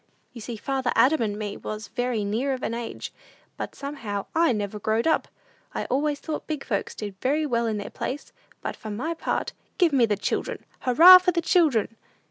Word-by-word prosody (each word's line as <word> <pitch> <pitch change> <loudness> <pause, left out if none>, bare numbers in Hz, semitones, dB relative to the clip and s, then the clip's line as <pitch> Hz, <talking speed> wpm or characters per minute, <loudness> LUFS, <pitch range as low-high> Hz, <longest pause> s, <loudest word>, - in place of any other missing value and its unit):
You 235 - -9
see 235 +2 -5
father 265 +1 -1
Adam 265 +6 +4
and 210 -2 -1
me 210 -1 -4
was 215 -1 -6
very 245 -4 -1
near 240 +7 0
of 255 - -5
an - - -1
age, 235 0 -5 0.4
but - - -6
somehow 235 -9 -5
I 330 -3 +4
never 210 -2 -3
growed 220 +2 0
up! 320 - +2 0.5
I - - -2
always 290 +2 +1
thought 310 -2 -5
big 305 -3 -3
folks 200 -5 -2
did 205 -3 -7
very 295 +4 +1
well 235 -4 0
in 220 -1 -1
their 205 - -6
place; 270 +3 -5 0.3
but - - -3
for 215 - -9
my 250 +11 -2
part, 330 - -2 0.2
give 345 -5 +3
me 245 -4 +4
the 205 -2 0
children. - - -3
Hurrah 335 +9 +9
for 365 0 +1
the 340 - 0
children!" 295 - +2
245 Hz, 200 wpm, -25 LUFS, 215-295 Hz, 0.5 s, Hurrah